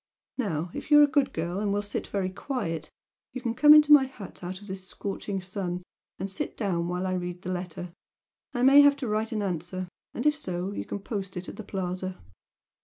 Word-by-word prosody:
Now 170 -7 -1
if - - -7
you 295 -1 +8
are - - +9
a - - +6
good 285 -2 +2
girl, 170 +3 -2
and 205 -1 0
will 205 +1 0
sit 205 - -4
very 190 -2 -1
quiet, 185 - -3 0.4
you 255 - -4
can 235 -2 -1
come 295 +4 +7
into 300 0 +9
my 270 -3 +7
hut 205 -8 -11
out 185 +1 -5
of 205 - -13
this 190 -1 -6
scorching 195 0 -4
sun, 180 -1 -4 0.3
and 195 +1 -4
sit 280 +10 -4
down 175 -6 0
while 180 +1 -2
I 185 - 0
read 180 0 -4
the 185 - -3
letter 180 -1 -5 0.6
I 245 -2 -1
may 275 +2 +9
have 285 0 +6
to 275 -3 -4
write 215 +1 -1
an 215 -2 -1
answer 180 0 -3 0.3
and 240 - -3
if 300 0 +5
so 185 - -3
you - - -4
can - - -4
post 195 -3 -4
it 180 - -5
at - - -7
the 220 - -7
Plaza." 185 -1 -4
195 Hz, 225 wpm, -28 LUFS, 180-240 Hz, 0.6 s, are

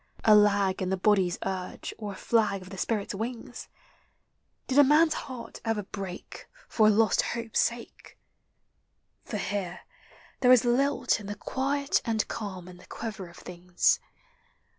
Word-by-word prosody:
A 215 - +6
lag 200 -2 +4
in 185 - -1
the 190 - 0
body's 185 -2 +2
urge 185 -1 -4
or 210 -2 -5
a - - -10
flag 205 -3 +1
of 185 - -13
the 195 - -8
spirits 210 -1 -1
wings? 230 +3 -6 1.0
Did 270 +2 +2
a - - +10
man's 305 +3 +5
heart 250 -5 -8
ever 225 -2 -1
break 190 -2 -8 0.2
For 215 -2 +3
a - - +7
lost 215 -1 +3
hope's 230 -1 -2
sake? 235 0 -3 1.1
For 215 - -5
here 195 -2 -3 0.6
there 250 -1 +5
is 250 -1 +6
lilt 270 +3 +2
in 205 - -9
the 205 - -4
quiet 275 +6 -1
and 220 -2 0
calm 190 -5 -6
in 180 -1 -11
the 180 - -17
quiver 215 -5 -6
of 170 - -16
things. 180 0 0
210 Hz, 160 wpm, -28 LUFS, 190-235 Hz, 1.1 s, a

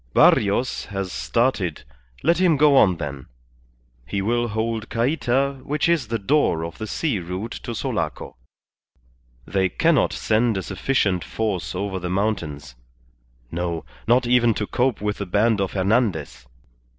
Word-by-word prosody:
Barrios 105 +5 +3
has 95 -3 -4
started, 115 - 0 0.4
let 170 +4 +3
him 175 -5 +4
go 145 0 +5
on 95 -9 +5
then; 70 -4 -6 0.8
he 100 - -2
will 120 +4 0
hold 110 0 -2
Cayta, 135 +2 0
which 150 +3 0
is 165 -8 +1
the 115 +1 -1
door 100 - +1
of 85 - -9
the 110 - -4
sea 135 -3 -1
route 90 +6 -5
to 120 - -5
Sulaco. - - -3 1.1
They 95 -1 +1
cannot 165 - +2
send 110 0 +1
a 95 - -3
sufficient 95 -3 0
force 105 -6 -3
over 95 0 -2
the 90 0 -4
mountains. 85 - -2 0.8
No; 85 -1 -3 0.2
not 120 +2 +4
even 120 -2 +3
to 105 - -2
cope 125 +1 0
with 105 0 -2
the 100 - -4
band 105 +3 +2
of 95 - -2
Hernandez. 95 - 0
110 Hz, 145 wpm, -23 LUFS, 95-125 Hz, 1.1 s, go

